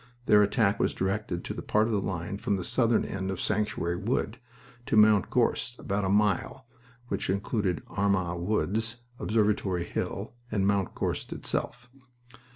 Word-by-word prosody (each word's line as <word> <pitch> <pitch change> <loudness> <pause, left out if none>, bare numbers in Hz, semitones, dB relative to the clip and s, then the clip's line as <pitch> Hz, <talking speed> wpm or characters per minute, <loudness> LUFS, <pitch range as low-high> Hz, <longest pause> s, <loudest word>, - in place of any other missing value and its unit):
Their 105 -3 +6
attack 105 -1 +2
was - - +1
directed 95 -2 -2
to - - -3
the - - -6
part 105 +1 +2
of 115 - -1
the 100 - +1
line 95 +1 -3
from 100 - 0
the 95 - -3
southern 120 +1 +2
end 95 0 -3
of 95 -2 -3
Sanctuary 105 -5 -1
Wood 110 +3 -1 0.5
to 110 - +2
Mount 105 -1 +6
Gorst, 120 0 +1
about 100 +1 -2
a - - 0
mile, 105 +5 +1 0.4
which - - -2
included 100 -1 -1
Armagh 95 -4 0
Wood, 105 +3 0 0.4
Observatory 105 -5 +1
Hill, 100 +5 -4 0.2
and 100 -3 +1
Mount 100 -1 +1
Gorst - - -2
itself. 125 +1 -3
100 Hz, 160 wpm, -28 LUFS, 95-110 Hz, 0.5 s, Their